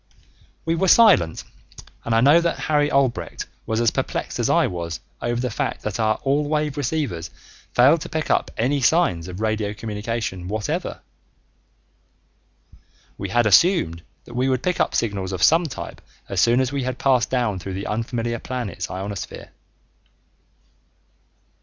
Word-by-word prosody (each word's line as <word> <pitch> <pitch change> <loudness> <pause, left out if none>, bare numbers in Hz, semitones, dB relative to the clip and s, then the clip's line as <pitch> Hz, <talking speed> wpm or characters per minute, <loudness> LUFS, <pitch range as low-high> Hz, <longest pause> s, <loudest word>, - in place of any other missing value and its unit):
We 165 - +1
were 180 +3 +1
silent, 135 - +5 0.6
and 115 - 0
I 115 - +4
know 145 +6 +6
that 170 0 0
Harry 150 -1 +1
Albrecht 135 -3 0 0.2
was 110 0 0
as 115 -2 +3
perplexed - - -3
as - - +1
I - - +4
was 85 -2 -4 0.2
over 120 0 -1
the 125 -1 -2
fact - - -3
that 105 +1 -3
our 110 -1 +2
all 140 +2 +2
wave 150 -2 0
receivers 140 - -2 0.5
failed 140 +7 +5
to - - -6
pick 155 -1 -2
up - - +1
any 135 +5 +1
signs 120 - +2
of 90 +2 -7
radio 110 -1 -1
communication 105 -3 -4
whatever. 105 +1 -3 2.2
We - - -4
had 120 0 +2
assumed 105 - +4 0.2
that 120 - -13
we 130 +2 +1
would 130 -1 0
pick 180 -1 0
up - - +1
signals 100 -4 -1
of 90 -1 -2
some 165 +2 +5
type 130 - -8 0.3
as 95 -3 0
soon 120 +5 +4
as 130 0 -1
we 140 -1 -2
had 125 0 -3
passed 130 -3 +2
down 120 -7 0
through 95 +2 -6
the 100 - -4
unfamiliar 115 +1 -2
planet's 110 -10 -4
ionosphere. 95 +1 -6
120 Hz, 160 wpm, -22 LUFS, 100-140 Hz, 2.2 s, know